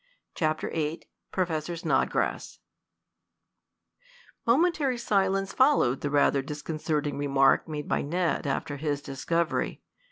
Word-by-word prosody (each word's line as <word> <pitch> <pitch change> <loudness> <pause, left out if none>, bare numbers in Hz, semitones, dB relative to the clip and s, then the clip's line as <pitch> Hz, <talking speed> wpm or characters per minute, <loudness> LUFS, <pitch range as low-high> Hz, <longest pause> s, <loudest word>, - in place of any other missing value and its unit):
CHAPTER 155 -2 -1
VIII 155 0 -2 0.3
PROFESSOR 170 -2 -1
SNODGRASS 165 - 0 1.9
Momentary 280 0 +3
silence 195 -3 +1
followed 260 - +3
the 145 - -1
rather 140 -1 +3
disconcerting 150 0 -3
remark 135 -1 +3
made 150 -2 -5
by - - +1
Ned 170 0 -1
after 140 +1 -2
his 145 -1 -2
discovery. 165 +5 -1
155 Hz, 100 wpm, -27 LUFS, 145-190 Hz, 1.9 s, Momentary